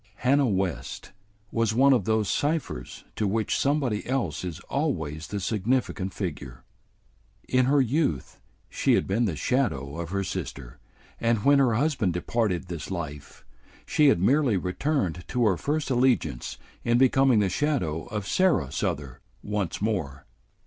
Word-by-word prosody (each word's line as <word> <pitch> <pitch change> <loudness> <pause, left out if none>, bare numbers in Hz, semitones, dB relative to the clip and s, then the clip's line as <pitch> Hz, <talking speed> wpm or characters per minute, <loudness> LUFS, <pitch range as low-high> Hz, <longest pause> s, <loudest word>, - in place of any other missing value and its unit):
Hannah 135 +4 +3
West 95 -5 -2 0.4
was 115 -1 0
one 135 +3 +6
of 115 -8 +1
those 110 -1 +1
ciphers 145 - -2
to 105 - 0
which 110 +2 0
somebody 135 -7 0
else 120 - -1
is 90 -2 -5
always 80 - -2
the 100 - -3
significant 105 -1 -1
figure. 70 - -6 0.8
In 130 0 +3
her 140 +2 +3
youth 125 - -1 0.3
she - - +2
had - - +1
been 115 +5 +1
the 90 -7 -1
shadow 75 - -1
of 85 -2 -4
her 100 +1 -1
sister, 65 -8 -6 0.4
and 115 -1 +1
when 140 0 +6
her 125 -5 +3
husband 125 - +1
departed 95 0 -1
this 85 -3 -6
life, 75 -6 -7 0.4
she 150 - +3
had 135 - +4
merely 125 - +3
returned 90 - -1
to 125 -2 +1
her 100 -4 +3
first 145 - -2
allegiance 120 - +1 0.3
in 120 0 +3
becoming 130 -1 +4
the 105 -2 +3
shadow 90 - -1
of 105 -2 -4
Sarah 165 - +2
Souther 70 -3 -3 0.2
once 105 -2 -2
more. 80 -11 -2
105 Hz, 150 wpm, -26 LUFS, 85-130 Hz, 0.8 s, one